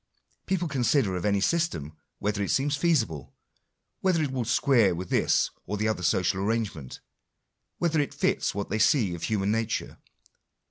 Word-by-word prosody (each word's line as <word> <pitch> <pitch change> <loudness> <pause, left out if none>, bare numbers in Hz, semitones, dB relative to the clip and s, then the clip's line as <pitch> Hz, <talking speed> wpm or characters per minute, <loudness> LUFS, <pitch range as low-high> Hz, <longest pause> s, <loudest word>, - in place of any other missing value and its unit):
People 185 -2 0
consider 130 -7 +1
of 90 - -3
any 100 -1 +2
system, 100 - -1 0.2
whether 105 0 -2
it 100 - -1
seems 145 0 +1
feasible, 130 - 0 0.6
whether 180 -4 +2
it 140 - -2
will 125 -3 -2
square 115 - +3
with 90 +1 -6
this - - +2 0.2
or 105 - -2
the 110 +2 0
other 110 -4 -1
social 95 +1 +1
arrangement, 100 - -3 0.8
whether 165 -2 +1
it 145 - 0
fits - - 0
what 100 -1 -3
they 110 - -1
see 110 -4 +3
of 85 - -7
human 100 -1 0
nature. 115 0 -2
110 Hz, 160 wpm, -27 LUFS, 95-145 Hz, 0.8 s, square